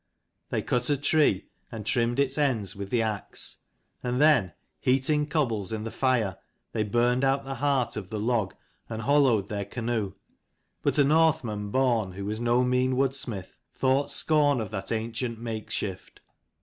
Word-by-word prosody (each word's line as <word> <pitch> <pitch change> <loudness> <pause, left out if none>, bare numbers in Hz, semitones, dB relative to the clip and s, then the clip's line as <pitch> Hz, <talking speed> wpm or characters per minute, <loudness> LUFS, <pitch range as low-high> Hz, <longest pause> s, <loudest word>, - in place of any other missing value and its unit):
They - - -1
cut 125 +1 0
a 145 - +3
tree, 145 -8 +2 0.3
and 110 -3 -6
trimmed 120 +3 +1
its 135 -1 +2
ends 120 - 0
with 100 0 -6
the 115 0 +2
axe; 110 -2 -4 0.4
and 125 0 -1
then, 140 - +4 0.3
heating 140 +3 +2
cobbles 115 - 0
in 110 -1 -3
the 115 - -5
fire, 120 -8 +1 0.3
they 110 - -1
burned 120 +4 +2
out 135 0 +2
the 135 - -5
heart 140 -4 +1
of 95 -4 -5
the 110 - -3
log 110 -3 0 0.3
and 110 0 -4
hollowed 130 -7 +3
their 100 -1 -3
canoe. 110 -2 -2 0.7
But - - 0
a 145 - +6
Northman 140 -9 +2
born, 115 -6 +1
who 100 +1 -6
was 105 +2 -2
no 120 +1 +3
mean 125 +1 +2
woodsmith, 130 -7 -2 0.2
thought 135 +2 +2
scorn 145 -4 +3
of 110 -3 -4
that 95 -3 -4
ancient 115 +1 -2
makeshift. 110 -4 -5
120 Hz, 160 wpm, -27 LUFS, 105-135 Hz, 0.7 s, a